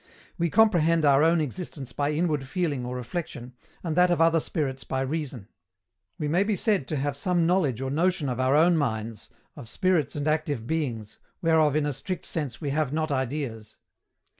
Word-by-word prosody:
We 170 0 +1
comprehend 165 -6 +4
our 140 0 +5
own 165 +1 +4
existence 145 -3 -5
by 145 +1 0
inward 150 -4 0
feeling 150 -5 -1
or 125 - -4
reflexion, 125 -1 -5 0.3
and 165 -3 -2
that 180 +1 +5
of 175 - +1
other 165 0 +4
spirits 140 -5 -3
by 130 - -2
reason. 135 -6 -4 0.7
We 150 - -2
may 175 +6 +2
be 210 0 0
said 195 - 0
to 155 - -2
have 145 0 -1
some 175 +3 +1
knowledge 160 - +1
or 135 0 -2
notion 165 0 +1
of 125 -1 -2
our 130 +2 +3
own 165 +2 +5
minds, 110 -6 -3 0.3
of 115 - -10
spirits 180 -3 +1
and 145 0 -2
active 145 -6 -1
beings, 120 -8 -3 0.2
whereof 160 -3 +3
in 155 -1 +2
a 145 - -1
strict 185 +7 -5
sense 145 -7 -4
we 145 -3 -3
have 150 -2 0
not 155 0 -1
ideas. 130 -5 -3
150 Hz, 190 wpm, -26 LUFS, 130-165 Hz, 0.7 s, our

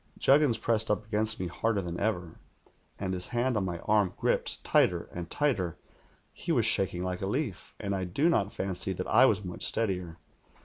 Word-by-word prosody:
Juggins 140 -4 +4
pressed 110 -1 0
up 105 0 0
against 110 +1 0
me 95 - -2
harder 100 +5 -1
than 90 -2 -4
ever, 90 -6 -2 0.6
and 95 -1 -3
his 90 -1 -1
hand 120 +1 0
on 105 - +1
my 90 -2 -3
arm 105 -4 +1
gripped - - 0
tighter - - +3
and 85 -1 -6
tighter. 105 - 0 0.6
He - - -4
was - - +2
shaking 90 -2 +2
like 90 0 -3
a 95 - -2
leaf, 110 - -3
and 100 -2 -2
I 95 -1 -2
do 115 - +1
not 105 - +2
fancy 95 0 -3
that 90 0 -4
I 125 +5 +6
was 105 -3 0
much 90 - -2
steadier. 90 -7 0
100 Hz, 190 wpm, -29 LUFS, 90-110 Hz, 0.6 s, I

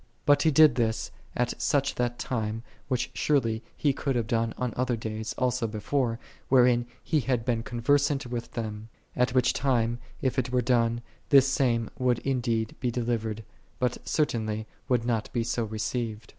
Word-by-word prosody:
But 145 -1 +5
He 160 - +4
did 155 -1 +7
this 115 -2 -1 0.2
at 120 0 0
that 125 -4 +1
time, 115 -2 -3 0.2
which 125 0 -1
surely 115 -7 +1 0.2
He 145 -2 +2
could 135 0 -2
have 120 -2 +1
done 115 -1 0
on 125 -3 -2
other 125 -1 0
days 110 0 -4
also 125 -2 +1
before, 115 +3 -1 0.3
wherein 125 -2 +4 0.2
He 155 - +1
had 125 -4 -1
been 115 -3 +1
conversant 140 +4 +1
with 120 -1 -5
them; 110 -1 -5 0.3
at 125 0 +1
which 125 -1 +4
time 120 -3 +1 0.2
if 130 -1 0
it 125 0 -2
were 125 -1 +2
done, 120 -1 +2 0.3
this 135 -1 +7
same 120 -4 +1
would 125 -2 +2
indeed 120 -4 0
be 125 - 0
delivered, 115 -2 -2 0.3
but 125 -1 -1
certainly 110 -7 -1 0.2
would 120 -3 +2
not 115 -3 -1
be 120 - +1
so 115 0 -1
received. 110 0 -3
120 Hz, 165 wpm, -27 LUFS, 115-130 Hz, 0.3 s, did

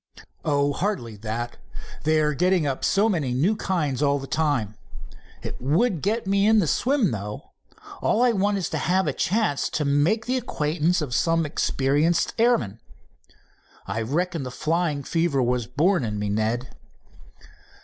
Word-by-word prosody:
"Oh, 145 -1 +1
hardly 170 - -2
that. 115 +3 -4 0.5
They 155 0 +3
are 150 0 +1
getting 180 +1 +2
up 135 -2 -2
so 200 +3 +3
many 150 - -1
new 175 +12 +2
kinds 155 - -1
all 140 -1 +3
of 140 - -3
the - - -7
time. 145 -10 0 0.7
It - - -6
would 165 - +1
get 220 +4 -1
me 200 +1 +2
into 220 -1 +5
the 165 - 0
swim, 250 - +1
though. 105 -1 -6 0.5
All 235 - +2
I 250 - +4
want 205 -1 +1
is 190 - -2
to - - -2
have 185 +2 +1
a - - -1
chance 205 -7 0
to 150 - -2
make 150 +11 +2
the 255 +1 0
acquaintance 165 -6 0
of 130 -5 -5
some 165 +5 +2
expert 145 +3 +1
airman. 120 - +2 1.1
I 105 +4 -3
reckon 165 +7 -1
the 130 - -5
flying 155 +1 -1
fever 165 -2 0
was 125 -2 0
born 155 +6 +2
in 105 -2 -3
me, 105 0 -2
Ned." 110 +4 -1
155 Hz, 165 wpm, -24 LUFS, 130-190 Hz, 1.1 s, into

